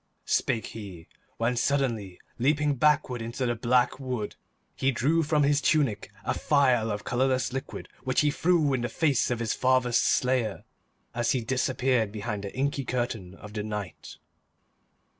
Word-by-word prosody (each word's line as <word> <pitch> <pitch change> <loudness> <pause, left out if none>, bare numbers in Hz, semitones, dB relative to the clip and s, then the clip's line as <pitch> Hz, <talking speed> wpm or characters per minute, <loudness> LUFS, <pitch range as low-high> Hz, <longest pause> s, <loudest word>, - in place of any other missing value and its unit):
spake 120 -4 0
he, 95 -7 -9 0.3
when, 115 +2 0
suddenly 120 -8 0 0.2
leaping 145 +3 +2
backwards 140 -3 +2
into 120 +3 -3
the 120 - +1
black 120 +2 +1
wood, 125 -6 -4 0.4
he 135 - +1
drew 140 +6 +2
from 150 -1 +2
his 145 +1 +3
tunic 140 -10 +1 0.2
a - - +1
phial 130 -6 +2
of 105 -1 -3
colourless 130 0 0
liquid 135 +1 -5 0.2
which 130 -1 +2
he 150 -1 +2
threw 160 -3 +2
in 130 - 0
the 120 - -2
face 140 0 +1
of 120 - 0
his 115 -2 -1
father's 130 -2 +2
slayer 125 -5 +1 0.5
as 120 0 +1
he 130 - 0
disappeared 125 -2 0
behind 105 -1 -4
the 100 - -7
inky 140 +1 0
curtain 120 -7 -3
of 105 +1 -12
the 105 - -2
night. 105 -3 -6
125 Hz, 160 wpm, -27 LUFS, 115-135 Hz, 0.5 s, his